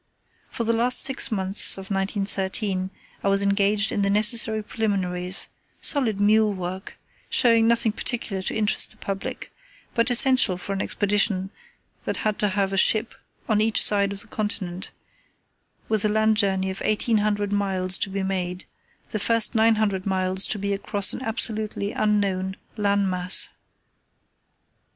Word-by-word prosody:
For 235 - -4
the 230 0 +1
last 240 +2 +1
six 270 -1 +1
months 195 -1 +2
of 195 +1 -10
1913 195 0 -2 0.3
I - - -1
was 195 0 +3
engaged 200 +1 +1
in 205 - -1
the 200 - +1
necessary 215 +1 +2
preliminaries, 190 -4 -2 0.3
solid 235 -9 +1
mule 210 0 +3
work, 185 +1 -7 0.3
showing 230 -2 +3
nothing 230 -1 +3
particular 210 -3 -3
to - - -3
interest 215 -1 +1
the 215 - -6
public, 195 -1 -6 0.4
but 230 +1 +2
essential 245 -6 +4
for 195 +2 -6
an 195 - -3
Expedition 200 -2 0 0.5
that - - -4
had 215 -1 -1
to 210 - +1
have 195 0 -1
a - - -1
ship 215 +4 +2 0.3
on 215 -2 +1
each 220 0 +2
side 200 -1 +2
of 200 0 -7
the - - -13
Continent, 195 -4 -4 1.0
with 220 -2 0
a 215 - +2
land 220 +1 +2
journey 190 -2 0
of 190 - -8
eighteen 215 +1 +1
hundred 205 -1 -1
miles 190 -2 +1
to - - -1
be 195 0 -3
made, 185 -1 -3 0.5
the 215 - -3
first 230 +3 +3
nine 225 0 +3
hundred 200 -3 -1
miles 190 0 +1
to - - -1
be 200 0 -2
across 200 0 +2
an - - -6
absolutely 215 -3 -2
unknown 195 -3 -1 0.2
land 200 -2 +1
mass. 180 0 +2
205 Hz, 155 wpm, -23 LUFS, 190-220 Hz, 1.0 s, essential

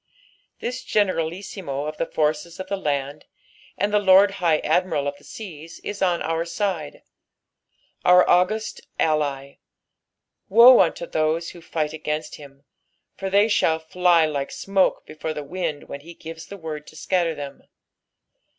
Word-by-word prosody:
This 250 +2 -4
Generalissimo 175 - -1
of 155 0 -5
the 165 - -1
forces 155 +3 -1
of 185 - -4
the 200 - 0
land, 145 -5 -3 0.5
and 205 +2 0
the 210 - +5
Lord 195 0 +6
High 165 -3 +4
Admiral 160 -3 +1
of 140 - -3
the - - -22
seas, 165 -6 -10
ia - - -2
on 180 -3 +1
our 165 +1 -1
side 170 -3 -3 0.5
— - - -43
our 180 0 +7
august 215 +5 +1 0.2
ally; 140 -3 -1 0.9
woe 235 +5 +9
unto 170 -1 +2
ihoae 160 +1 -1
who 175 - -13
6ght 155 -2 -3
against 155 0 -4
him, 140 -1 -14 0.5
for 195 - -4
they 200 +2 +4
shall 165 -6 +2
fly 170 +1 +3
like 145 -3 -2
smoke 195 -1 0
before 155 0 -5
the 150 - -4
wind 160 -1 -4
when 140 - -7
he 170 +3 -12
gives 165 0 -9
the 200 - -9
word 155 -4 -7
to - - -14
scatter 170 +1 0
them. 140 -1 -8
165 Hz, 155 wpm, -23 LUFS, 150-185 Hz, 0.9 s, woe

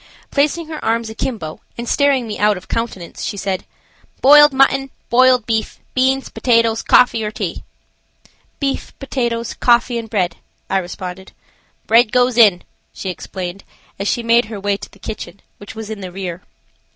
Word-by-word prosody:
Placing 300 +4 +1
her 310 -1 -6
arms 225 0 0
akimbo 220 -8 -4 0.2
and 235 0 -5
staring 275 -4 +2
me 210 - -5
out 210 -1 +3
of 180 - -12
countenance 225 -7 -4
she 205 - -3
said: 195 -1 -3 0.5
"Boiled 295 +2 +8
mutton, 270 0 +3 0.2
boiled 250 -1 +5
beef, 220 -1 -1 0.2
beans, 265 +1 +1
potatoes, 230 -2 +2
coffee 235 -3 +4
or 210 - -1
tea?" 215 - -5 1.0
"Beef, 275 -2 -3
potatoes, 235 -4 -2
coffee 240 0 +2
and 225 -1 -8
bread," 190 -6 -1 0.3
I 195 - +3
responded. 185 +1 -7 0.5
"Bread 230 -1 +4
goes 250 -1 +3
in," 210 -7 +5 0.3
she 190 - -5
explained, 180 +1 -7 0.4
as 200 - -2
she 235 - 0
made 235 +1 +4
her 215 -2 -7
way 200 0 0
to - - -9
the - - -19
kitchen, 210 -2 -7 0.2
which 205 - -10
was 220 -1 -7
in 215 -2 -6
the 185 -1 -6
rear. 180 -2 -5
230 Hz, 165 wpm, -18 LUFS, 200-250 Hz, 1.0 s, Boiled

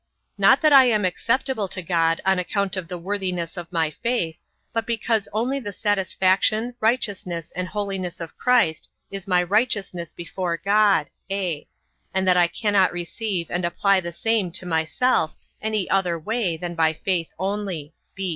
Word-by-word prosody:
Not - - +5
that 305 -2 +5
I 270 -2 +9
am 215 -5 +2
acceptable 230 +4 0
to 185 0 -6
God, 165 -1 +1
on 190 -1 +3
account 200 +1 -1
of 185 -3 -4
the 180 0 -5
worthiness 180 -2 -3
of 175 -1 -7
my 165 -3 +1
faith; 175 -5 -2 0.3
but 225 -1 -1
because 230 -2 0
only 245 +6 0
the 205 -6 -5
satisfaction, 205 +3 +1
righteousness, 200 -8 -1
and 185 0 -2
holiness 195 -3 -4
of 165 -1 -7
Christ, 235 -11 +2 0.2
is 195 -1 -6
my 180 -2 +3
righteousness 195 -3 0
before 175 0 -3
God; 200 -4 +3 0.2
(a) 185 -6 -2 0.5
and 190 0 +1
that 180 - +5
I 175 -1 +5
cannot 200 +1 +2
receive 175 +1 -3
and 175 +1 -1
apply 190 +3 +2
the 170 -1 -5
same 215 +1 0
to 185 - -2
myself 160 +3 +1 0.3
any 215 -3 -1
other 180 -3 +2
way 185 0 -1
than 175 +1 -5
by 160 -1 +2
faith 170 0 -1
only. 190 -5 -3
190 Hz, 160 wpm, -23 LUFS, 170-215 Hz, 0.5 s, I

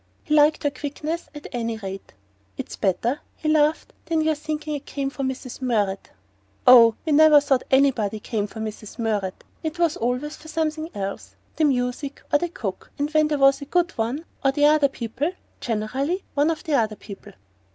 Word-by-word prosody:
He 305 - -2
liked 300 0 +4
her 290 - +1
quickness, 300 +4 -5
at 295 - -9
any 230 -2 -2
rate. 195 - -8 0.4
"It's - - -6
better," 230 +8 0 0.2
he 310 - -5
laughed, 310 0 +2
"than 325 -1 +1
your 315 0 +2
thinking 305 0 -4
I 290 - -2
came 275 -1 -4
for 275 - -6
Mrs. 265 -1 -4
Murrett!" 210 -6 0 0.6
"Oh, 230 -3 +8
we 315 - 0
never 305 0 +8
thought 275 -3 +1
anybody 250 -6 +2
came 210 -1 -2
for 220 - -10
Mrs. 215 -1 -6
Murrett! 210 -5 -2 0.2
It 315 +1 -4
was 340 -3 +1
always 250 +6 -2
for 315 - -14
something 315 0 -2
else: 200 -1 -5 0.2
the 315 - +3
music, 260 +1 -1
or 290 - +6
the 350 - -2
cook 205 - -6 0.2
when 310 -1 +4
there 300 -1 0
was 275 0 +4
a - - -5
good 345 +3 +1
one 240 +8 -3 0.2
or 270 - +4
the 290 +2 +2
other 300 -1 +5
people; 270 +7 -3 0.3
generally 260 - -2
ONE 290 +2 +2
of 325 -1 -2
the 315 - -2
other 220 -5 +2
people." 200 -2 -11
275 Hz, 185 wpm, -24 LUFS, 230-305 Hz, 0.6 s, Oh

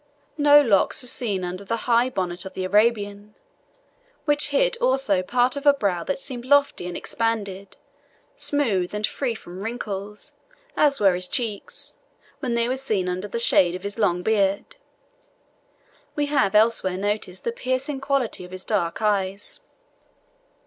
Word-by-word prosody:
No 290 0 +7
locks 225 +2 +2
were - - -6
seen 220 -7 0
under 180 +2 -5
the 230 +4 -2
high 240 +1 +3
bonnet 180 -6 -3
of 190 - -9
the 185 - -3
Arabian, 205 0 +1 0.9
which 295 -1 +3
hid 485 - +2
also 260 - +1
part 245 +7 +1
of 280 +1 -4
a 285 - +7
brow 190 -9 -1
that 280 - -2
seemed 255 -3 -3
lofty 280 -8 +2
and 180 - -5
expanded, 200 -4 -3 0.6
smooth, 210 -11 0
and 210 0 +1
free 245 -1 -3
from 180 -2 -10
wrinkles, 210 -2 -6 0.4
as 285 -2 +3
were 195 -3 +4
his 180 0 -1
cheeks, 220 -3 -3 0.4
where 255 - -3
they 235 0 +1
were 255 +2 -1
seen 215 -9 -1
under 180 +3 -3
the 220 - -4
shade 180 -6 +3
of 185 - -8
his 200 +2 -3
long 180 -4 +1
beard. 200 -2 0 1.4
We 295 - 0
have 275 -9 +1
elsewhere 210 -4 +4
noticed 200 -2 -3
the 235 - -1
piercing 260 +3 -3
quality 275 -8 -1
of 180 - -10
his 185 0 -6
dark 195 -2 -1
eyes. 200 - 0
210 Hz, 155 wpm, -23 LUFS, 190-255 Hz, 1.4 s, No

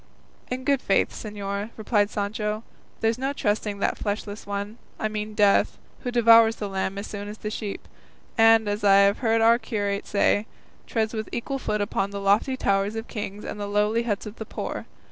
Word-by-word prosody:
"In 255 +1 -3
good 275 -1 +2
faith, 195 - +2
señor," 205 0 -5
replied 210 -2 +1
Sancho, 210 +1 -2 0.4
"there's 225 +2 +1
no 270 +2 -1
trusting 210 -4 -1
that 200 - -1
fleshless 205 0 -4
one, 205 +3 -4 0.2
I 215 - 0
mean 215 0 -4
Death, 205 -1 +3 0.2
who 250 - -4
devours 230 -2 +6
the 210 - -4
lamb 195 0 -2
as 200 - -4
soon 205 -1 -6
as 210 +1 -7
the 210 - -5
sheep, 210 -2 -5 0.5
and, 225 -1 +6
as 205 +1 -2
I 200 -1 +6
have 200 +1 +3
heard 225 -2 +2
our 230 +1 +5
curate 205 -4 -2
say, 205 +1 +2 0.4
treads 220 -1 -1
with 220 -1 -4
equal 270 +3 -3
foot 210 -4 -1
upon 200 -1 -1
the 200 0 -5
lofty 205 +7 +2
towers 200 -1 +1
of 225 +1 -5
kings 205 -2 -6
and 210 - -5
the 205 - -3
lowly 210 +3 +2
huts 215 -3 -2
of 210 +1 -8
the 220 - -6
poor. - - -5
210 Hz, 195 wpm, -25 LUFS, 205-225 Hz, 0.5 s, devours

